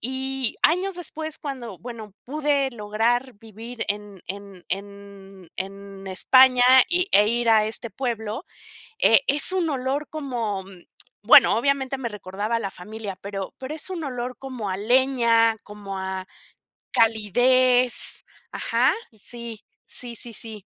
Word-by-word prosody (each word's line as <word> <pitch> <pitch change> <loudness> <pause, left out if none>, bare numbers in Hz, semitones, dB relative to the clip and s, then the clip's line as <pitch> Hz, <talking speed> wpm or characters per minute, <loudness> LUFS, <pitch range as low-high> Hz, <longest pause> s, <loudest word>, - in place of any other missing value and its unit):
Y 265 0 -2
años 360 +3 +2
después 315 -2 -4
cuando, 240 - -6
bueno, 220 -1 -9
pude 285 -1 0
lograr 235 +4 0
vivir 225 +3 -8
en 205 -2 -4
en 195 -1 -8
en 195 -2 -8
en 195 0 -7
España, 255 +6 +5 0.2
y 360 +2 +3
e 210 +1 +7
ir 235 0 0
a 220 -1 +5
este 225 +2 -3
pueblo, 230 - -4 0.5
eh, - - +6
es 295 - +2
un 360 -3 0
olor 275 +1 -2
como, 235 -10 -3 0.6
bueno, - - +7
obviamente 270 +1 0
me 245 -3 -3
recordaba 205 +2 -3
a - - 0
la 195 - -3
familia, 210 +2 -7
pero 195 -1 -5
pero 265 +4 -6
es 320 +4 -6
un 340 -4 -4
olor 250 -2 -5
como 255 -7 -5
a 185 - -3
leña, 235 -1 +3
como 200 -2 -7
a 190 0 -4 0.7
calidez. 245 +3 +2 0.3
Ajá, 240 +4 +2 0.2
sí, 230 0 -7 0.2
sí, 240 -2 -5
sí, 235 +1 -4
sí. 215 -2 -7
230 Hz, 135 wpm, -24 LUFS, 205-265 Hz, 0.7 s, e